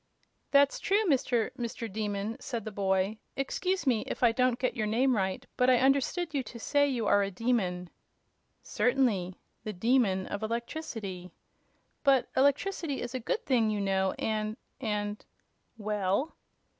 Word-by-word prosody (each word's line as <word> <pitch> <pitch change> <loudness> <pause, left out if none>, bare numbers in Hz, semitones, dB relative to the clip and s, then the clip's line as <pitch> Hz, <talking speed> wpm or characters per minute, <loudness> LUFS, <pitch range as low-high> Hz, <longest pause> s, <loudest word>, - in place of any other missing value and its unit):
"That's 280 0 +4
true, 415 +3 +2
Mr. 250 - +1
Mr. 235 0 -4
Demon," 210 0 -2
said 235 -5 -5
the 215 - -4
boy. 195 +1 0 0.2
"Excuse 365 +8 -1
me 240 -5 +3
if - - -4
I 235 - +6
don't 250 0 +2
get 255 0 -1
your 215 -3 -1
name 250 +4 +2
right, 190 -2 -1
but 250 0 +3
I 255 - +6
understood 280 +6 +1
you 280 - +1
to 245 - -9
say 285 +4 +2
you 245 -5 -1
are 205 - +4
a 200 - 0
demon." 185 -4 -1 0.8
"Certainly. 225 -9 +1 0.3
The 215 -1 -4
Demon 200 -2 +2
of 205 - -5
Electricity." 225 - -4 0.7
"But 275 -3 +4
electricity 285 +2 +1
is 240 - -5
a 255 - -2
good 440 - -2
thing, 235 -5 +3
you 210 -1 -1
know, 190 -1 +1
and 215 0 -2 0.2
and 210 -3 -2 0.3
" - - -45
"Well?" 210 - 0
230 Hz, 155 wpm, -30 LUFS, 205-265 Hz, 0.8 s, I